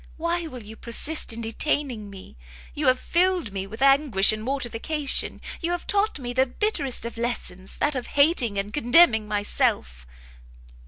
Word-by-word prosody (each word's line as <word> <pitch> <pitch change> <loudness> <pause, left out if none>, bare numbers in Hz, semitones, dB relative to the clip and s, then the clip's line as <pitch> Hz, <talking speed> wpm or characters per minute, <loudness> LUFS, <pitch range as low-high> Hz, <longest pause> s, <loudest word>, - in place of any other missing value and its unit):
why 335 +1 -2
will 250 -6 -9
you 215 +2 -11
persist 255 +6 0
in 230 +1 -2
detaining 230 -1 -1
me? 195 -1 -12 0.4
You 290 -1 -1
have 255 0 +4
filled 350 - +1
me 195 0 -4
with 220 +6 -5
anguish 270 -8 +4
and 215 - -5
mortification, 275 +4 -1 0.2
you 335 - -1
have 350 0 -3
taught 410 -1 0
me 245 -3 -5
the 260 +1 +2
bitterest 280 - -1
of 235 0 -6
lessons, 195 -6 -4
that 295 - 0
of 255 -3 -4
hating 280 - +3
and 200 +2 -3
contemning 240 -5 +4
myself!" 65 - -1
250 Hz, 160 wpm, -24 LUFS, 215-300 Hz, 0.4 s, have